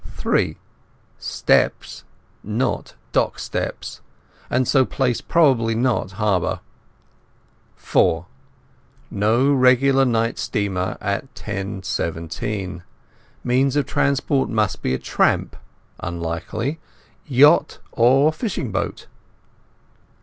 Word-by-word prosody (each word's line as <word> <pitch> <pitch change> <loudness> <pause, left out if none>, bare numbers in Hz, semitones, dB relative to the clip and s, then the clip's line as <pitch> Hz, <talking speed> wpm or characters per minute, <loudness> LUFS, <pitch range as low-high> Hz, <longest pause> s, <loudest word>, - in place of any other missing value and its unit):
(3) - - 0 0.6
Steps - - 0 0.4
not 115 +5 -2 0.2
dock - - +1
steps, - - -5 0.5
and 130 0 +1
so 135 -2 +4
place 125 -2 -1
probably 130 -9 +3
not 120 -5 0
harbour. 100 -3 0 1.2
(4) 85 +2 +1 0.9
No 115 +7 +2
regular 135 +1 +4
night 115 -2 0
steamer 95 -4 -2
at 100 +7 -3
10.17. 95 -2 -4 0.6
Means 130 +2 +2
of 145 -2 +2
transport 140 0 +1
must 105 -5 0
be 65 0 0
tramp - - 0 0.4
(unlikely), 85 - -4 0.5
yacht, 145 +4 +5
or 135 +6 +4
fishing 165 - -3
boat. 95 - -3
115 Hz, 85 wpm, -21 LUFS, 100-135 Hz, 1.2 s, yacht